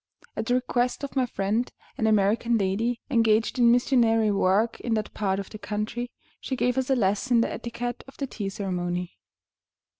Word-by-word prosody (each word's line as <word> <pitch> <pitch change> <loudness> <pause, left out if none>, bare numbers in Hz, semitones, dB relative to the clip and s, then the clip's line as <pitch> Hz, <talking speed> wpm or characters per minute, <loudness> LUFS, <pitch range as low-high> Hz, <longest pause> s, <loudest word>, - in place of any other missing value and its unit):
At 225 - -3
the 245 - +3
request 250 +1 0
of 280 - -5
my 260 -2 +2
friend, 220 +3 -1 0.2
an 220 - 0
American 220 +3 +3
lady 220 +4 0
engaged 225 0 +2
in 235 -1 +6
missionary 230 -3 +3
work 200 +3 +2
in 230 -2 -1
that 215 -1 -3
part 195 -2 0
of 195 - -7
the 215 - -8
country, 215 +4 -3 0.3
she 265 - -3
gave 250 0 +1
us 265 0 -1
a 265 - +4
lesson 225 +3 +2
in - - +5
the - - -1
etiquette 240 +1 -5
of 270 - -14
the 280 - -2
tea 210 -6 -4
ceremony. 180 -2 -3
225 Hz, 185 wpm, -26 LUFS, 205-245 Hz, 0.3 s, in